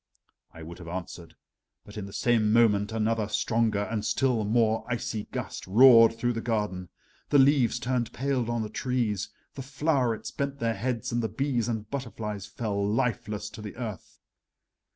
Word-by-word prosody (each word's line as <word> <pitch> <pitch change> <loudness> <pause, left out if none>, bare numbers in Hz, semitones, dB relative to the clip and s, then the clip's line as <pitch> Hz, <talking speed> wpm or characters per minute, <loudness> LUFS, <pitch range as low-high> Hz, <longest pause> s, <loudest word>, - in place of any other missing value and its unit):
I 80 - -11
would 85 +2 -9
have 85 - -10
answered, 85 -2 -7 0.5
but 105 - -13
in 105 -2 -5
the - - -10
same 110 -1 +2
moment 105 -2 +3
another 110 -1 0
stronger 110 -1 +1
and 105 0 -3
still 115 +1 +1
more 110 0 +2
icy 120 -3 -3
gust - - -6
roared 115 +2 +7
through 120 +1 0
the 115 - -3
garden. 105 -6 -2 0.4
The 145 - +4
leaves 135 -3 +4
turned 125 -1 -1
pale 130 -3 -1
on 120 -1 -1
the 105 - -5
trees, 120 -7 -1 0.2
the 135 - -7
flowerets 135 -4 -1
bent 140 0 -3
their 115 -3 0
heads, 115 +2 -3
and 120 0 0
the 110 - -2
bees 120 0 -1
and 110 -3 -3
butterflies 110 -7 -5
fell 100 -3 -3
lifeless 105 -1 -1
to - - -9
the 105 -1 -8
earth. 110 -7 -7
115 Hz, 170 wpm, -27 LUFS, 105-125 Hz, 0.5 s, roared